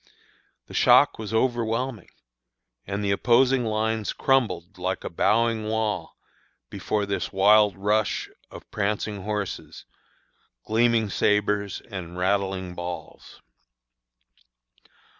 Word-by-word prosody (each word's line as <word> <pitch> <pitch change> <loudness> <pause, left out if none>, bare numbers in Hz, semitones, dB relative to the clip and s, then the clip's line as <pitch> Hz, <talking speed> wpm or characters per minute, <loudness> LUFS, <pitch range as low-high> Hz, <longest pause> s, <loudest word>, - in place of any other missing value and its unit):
The - - -13
shock - - +5
was 110 -1 -6
overwhelming; 120 0 -1 0.8
and 100 +1 -3
the 100 - 0
opposing 125 +5 +3
lines 110 0 -1
crumbled 95 -11 0
like 95 +1 -2
a - - -5
"bowing 115 +5 +1
wall" 110 -5 -2 0.5
before 105 -1 -2
this 100 0 -3
wild 105 +1 +4
rush 105 +1 0 0.2
of - - -12
prancing 105 0 -2
horses, 105 -2 -5 0.8
gleaming 115 -1 +2
sabres, 105 -1 0
and 90 -5 -8
rattling 95 -1 -1
balls. 90 0 -8
105 Hz, 100 wpm, -25 LUFS, 95-110 Hz, 0.8 s, shock